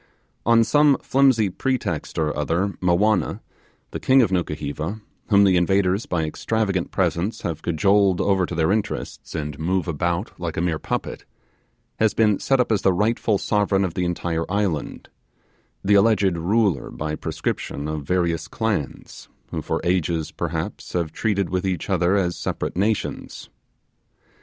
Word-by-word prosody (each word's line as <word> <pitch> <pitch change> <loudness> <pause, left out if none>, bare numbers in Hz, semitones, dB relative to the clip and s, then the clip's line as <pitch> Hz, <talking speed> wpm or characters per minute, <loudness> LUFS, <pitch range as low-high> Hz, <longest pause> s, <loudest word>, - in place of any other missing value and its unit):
On 115 -1 +6
some 145 +4 +4
flimsy 130 -6 +3
pretext 130 +7 -2
or 75 -1 0
other 85 +7 0
Mowanna, 90 +4 +2 0.5
the - - -4
king 130 0 +5
of 100 - 0
Nukuheva, 80 +2 -2 0.3
whom 100 -2 +6
the 95 -2 +4
invaders 95 +3 +2
by 85 -3 0
extravagant 95 +3 -1
presents 100 +6 -1
had 80 -2 -3
cajoled 95 +3 +2
over 95 -3 +2
to 90 - -5
their 80 +2 +2
interests, 105 -4 -3
and 75 -2 -4
moved 90 +3 0
about 85 +5 -1
like 85 -2 -4
a - - +1
mere 85 -3 0
puppet, - - -4 0.7
has 110 -1 +2
been 105 -3 +3
set 135 -1 +1
up 125 - +2
as 105 - +2
the 95 - +3
rightful 105 +2 +1
sovereign 100 -1 +1
of 90 - -4
the 90 -1 -1
entire 85 -1 -2
island 100 -7 -2 0.8
the 105 - +4
alleged 100 -3 +4
ruler 95 - +1
by 75 0 -4
prescription 70 -1 -4
of 75 -1 -3
various 85 0 0
clans, 105 -6 -4 0.2
who - - -3
for - - -2
ages 85 -2 0
perhaps - - -4
have 85 -3 -1
treated 100 -6 -1
with 95 0 0
each 95 -4 -2
other 90 +2 +2
as 90 -3 +1
separate - - -3
nations. 105 +3 -2
95 Hz, 150 wpm, -23 LUFS, 85-105 Hz, 0.8 s, On